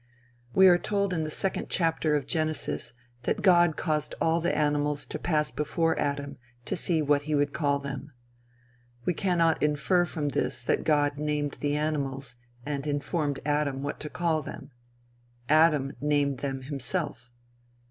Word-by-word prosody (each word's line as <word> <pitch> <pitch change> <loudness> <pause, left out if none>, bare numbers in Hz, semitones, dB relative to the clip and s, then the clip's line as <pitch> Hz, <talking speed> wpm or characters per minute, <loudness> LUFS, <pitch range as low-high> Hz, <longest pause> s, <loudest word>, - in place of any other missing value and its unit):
We 190 0 +8
are 175 -1 +6
told 200 -1 0
in 160 -2 -1
the - - -4
second 190 +5 -2
chapter 165 -3 +1
of 145 -3 -1
Genesis 155 0 0 0.3
that - - -2
God 175 -4 +5
caused 150 -3 -1
all 165 +1 +2
the 170 - 0
animals 145 -1 +1
to - - -5
pass 150 -3 0
before 160 +2 0
Adam 140 0 -2 0.3
to - - -1
see 165 -3 +3
what 145 0 +3
he 150 - +2
would 145 0 +1
call 140 -1 +1
them. 140 +1 -7 0.9
We 180 - +2
cannot 170 -3 +1
infer 150 +4 +2
from 150 -4 -2
this 125 -2 0
that - - 0
God 145 -2 +2
named 150 -1 -2
the 145 0 0
animals 140 -4 -2 0.3
and 145 0 -3
informed 145 0 -1
Adam 145 -2 0
what 145 - -4
to 150 - -4
call 165 -2 0
them. 140 0 -9 0.8
Adam 150 -2 +4
named 145 -2 +1
them 135 -2 -4
himself. 130 -3 -3
150 Hz, 160 wpm, -27 LUFS, 145-160 Hz, 0.9 s, We